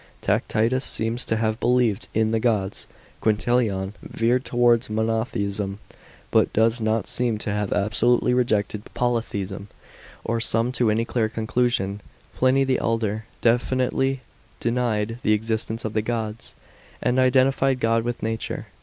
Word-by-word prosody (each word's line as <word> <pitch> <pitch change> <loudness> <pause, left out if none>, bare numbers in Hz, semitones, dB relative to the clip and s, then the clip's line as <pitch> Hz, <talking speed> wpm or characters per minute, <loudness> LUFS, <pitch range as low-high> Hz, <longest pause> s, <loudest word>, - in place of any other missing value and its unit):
Tacitus 120 +5 +1
seems 115 +1 -1
to 110 - 0
have 110 0 0
believed 120 -4 +2
in 110 0 +2
the 115 - +1
gods. 105 -4 0 0.3
Quintilian 105 -3 +1
veered 120 +3 0
towards 120 -1 +2
monotheism, 105 -3 -1 0.5
but - - +3
does 115 +2 +3
not 110 0 0
seem 120 -3 0
to 105 - -3
have 105 -1 -2
absolutely 115 +4 +2
rejected 105 -4 +1
poly 120 -1 +1
theism 100 -2 -5 0.6
or 115 0 0
come 115 +2 +3
to 120 -3 +1
any 110 +2 +1
clear 115 -2 0
conclusion. 110 -3 -1 0.3
Pliny 130 +1 +3
the 130 -1 +1
elder 110 -1 -1 0.2
definitely 130 +2 +1 0.4
denied 115 -2 -1
the 110 - +3
existence 110 +1 -2
of 110 - -3
the 110 - +1
gods, 110 -1 -4 0.4
and 125 +1 +1
identified 130 +1 +3
God 115 -1 +2
with 120 0 -4
nature. 115 0 -3
115 Hz, 135 wpm, -24 LUFS, 110-125 Hz, 0.6 s, but